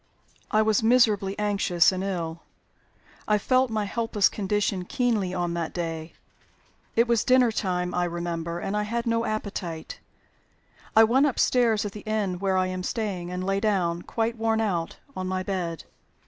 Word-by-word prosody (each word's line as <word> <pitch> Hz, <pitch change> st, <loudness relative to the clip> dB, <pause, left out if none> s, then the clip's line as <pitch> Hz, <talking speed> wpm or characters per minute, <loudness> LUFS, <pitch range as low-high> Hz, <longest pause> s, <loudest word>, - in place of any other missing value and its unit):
"I 215 Hz, 0 st, +3 dB
was 215 Hz, 0 st, +2 dB
miserably 220 Hz, -4 st, +3 dB
anxious 200 Hz, -5 st, +3 dB
and 185 Hz, 0 st, -3 dB
ill. 170 Hz, -4 st, -3 dB, 0.9 s
I 210 Hz, -, +4 dB
felt 255 Hz, +4 st, +2 dB
my 215 Hz, -2 st, -1 dB
helpless 220 Hz, -1 st, +1 dB
condition 205 Hz, -2 st, -1 dB
keenly 215 Hz, -2 st, 0 dB
on 175 Hz, -2 st, -2 dB
that 170 Hz, -2 st, -3 dB
day. 165 Hz, -2 st, -4 dB, 0.8 s
It 230 Hz, +1 st, +4 dB
was 235 Hz, -2 st, +2 dB
dinner 255 Hz, -2 st, +4 dB
time, 180 Hz, -4 st, -1 dB
I 180 Hz, 0 st, +1 dB
remember, 170 Hz, -1 st, -3 dB
and 195 Hz, +3 st, -3 dB
I 210 Hz, -, +1 dB
had 235 Hz, +3 st, -2 dB
no 230 Hz, 0 st, +1 dB
appetite. 195 Hz, -6 st, -4 dB, 1.0 s
I 225 Hz, -, +8 dB
went 260 Hz, +6 st, +4 dB
upstairs 235 Hz, -5 st, +2 dB
(at 205 Hz, -, -3 dB
the 210 Hz, -, -8 dB
inn 205 Hz, -4 st, -2 dB
where 190 Hz, -1 st, +1 dB
I 185 Hz, -, +2 dB
am 185 Hz, 0 st, -3 dB
staying), 190 Hz, -4 st, -3 dB
and 180 Hz, 0 st, -4 dB
lay 195 Hz, +1 st, 0 dB
down, 185 Hz, -5 st, 0 dB
quite 230 Hz, +4 st, -2 dB
worn 225 Hz, 0 st, +1 dB
out, 180 Hz, -7 st, -1 dB, 0.2 s
on 185 Hz, 0 st, -3 dB
my 185 Hz, 0 st, -2 dB
bed. 180 Hz, -4 st, -3 dB
200 Hz, 165 wpm, -26 LUFS, 180-220 Hz, 1.0 s, I